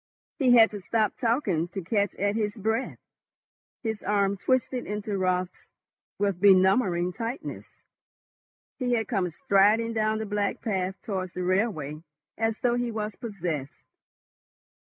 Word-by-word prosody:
He 255 Hz, -4 st, +5 dB
had 225 Hz, -1 st, +7 dB
to 205 Hz, -2 st, -6 dB
stop 215 Hz, +2 st, 0 dB
talking 220 Hz, -, 0 dB
to 190 Hz, +2 st, -6 dB
catch 200 Hz, +2 st, 0 dB
at 205 Hz, +1 st, 0 dB
his 215 Hz, 0 st, -1 dB
breath. 220 Hz, +5 st, -1 dB, 0.9 s
His 220 Hz, -2 st, -3 dB
arm 200 Hz, -1 st, +1 dB
twisted 255 Hz, +3 st, 0 dB
into 210 Hz, 0 st, -3 dB
Raut's 185 Hz, -1 st, -1 dB, 0.5 s
with 200 Hz, -3 st, -1 dB
benumbing 190 Hz, -2 st, +4 dB
tightness. 235 Hz, +5 st, -6 dB, 1.0 s
He 250 Hz, -2 st, 0 dB
had 225 Hz, -3 st, 0 dB
come 180 Hz, -2 st, 0 dB
striding 210 Hz, +7 st, +3 dB
down 215 Hz, -1 st, +1 dB
the 220 Hz, -, -3 dB
black 205 Hz, -1 st, -1 dB
path 190 Hz, -3 st, -1 dB
towards 185 Hz, -4 st, -3 dB
the 180 Hz, -, -3 dB
railway 180 Hz, -6 st, -1 dB, 0.3 s
as 225 Hz, 0 st, -1 dB
though 245 Hz, -2 st, +2 dB
he 245 Hz, -1 st, -1 dB
was 215 Hz, -2 st, -4 dB
possessed. 175 Hz, -, -5 dB
205 Hz, 135 wpm, -27 LUFS, 185-225 Hz, 1.0 s, had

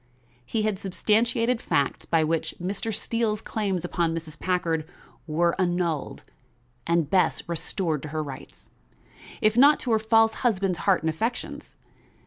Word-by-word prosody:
He 215 Hz, -, -2 dB
had 210 Hz, -3 st, -1 dB
substantiated 230 Hz, +5 st, +1 dB
facts 140 Hz, -, -1 dB
by 165 Hz, -1 st, +3 dB
which 160 Hz, +1 st, -1 dB
Mr. 200 Hz, +5 st, -3 dB
Steele's 220 Hz, 0 st, -1 dB
claims 195 Hz, -5 st, -2 dB
upon 170 Hz, -2 st, 0 dB
Mrs. 155 Hz, -2 st, -6 dB
Packard 165 Hz, -3 st, -1 dB, 0.4 s
were 170 Hz, +2 st, +2 dB
annulled 175 Hz, -4 st, -1 dB, 0.6 s
and 170 Hz, -2 st, +2 dB
Bess 185 Hz, +4 st, +2 dB
restored 170 Hz, -2 st, -2 dB
to -, -, -6 dB
her 155 Hz, +1 st, -2 dB
rights, 135 Hz, -3 st, -10 dB, 0.7 s
if 215 Hz, 0 st, +3 dB
not 285 Hz, +4 st, +6 dB
to 245 Hz, -, -2 dB
her 220 Hz, -, +4 dB
false 225 Hz, 0 st, +4 dB
husband's 195 Hz, -7 st, +1 dB
heart 195 Hz, -2 st, +2 dB
and 160 Hz, -, +1 dB
affections. 225 Hz, +10 st, -4 dB
185 Hz, 140 wpm, -26 LUFS, 165-220 Hz, 0.7 s, not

